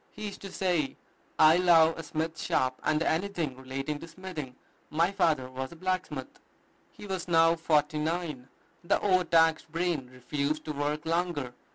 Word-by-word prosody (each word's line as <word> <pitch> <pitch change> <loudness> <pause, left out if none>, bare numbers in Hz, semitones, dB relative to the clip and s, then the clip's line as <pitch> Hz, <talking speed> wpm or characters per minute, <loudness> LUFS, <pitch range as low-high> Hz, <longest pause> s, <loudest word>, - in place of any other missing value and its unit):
He 215 - -7
used 205 - -7
to 195 - -8
say, 175 -7 0 0.4
"I 155 +2 +7
love 165 -3 +5
a - - -5
smith 160 +1 -3
shop, 130 0 0
and 155 +1 +2
anything 165 -5 -1
relating 135 +3 -4
to 165 - -9
smithing. 165 -7 -7 0.3
My 170 +4 +2
father 160 -9 +1
was 130 +1 -6
a - - -12
blacksmith." 185 -6 -3 0.5
He - - -12
was 190 -3 -4
now 165 -1 +5
forty 150 -2 +1
nine. 155 -5 -2 0.4
The 170 - +2
overtaxed 165 -4 +3
brain 165 -6 -1
refused 140 +4 -2
to 155 - -3
work 150 +2 -2
longer. 165 -6 -1
160 Hz, 160 wpm, -29 LUFS, 145-175 Hz, 0.5 s, I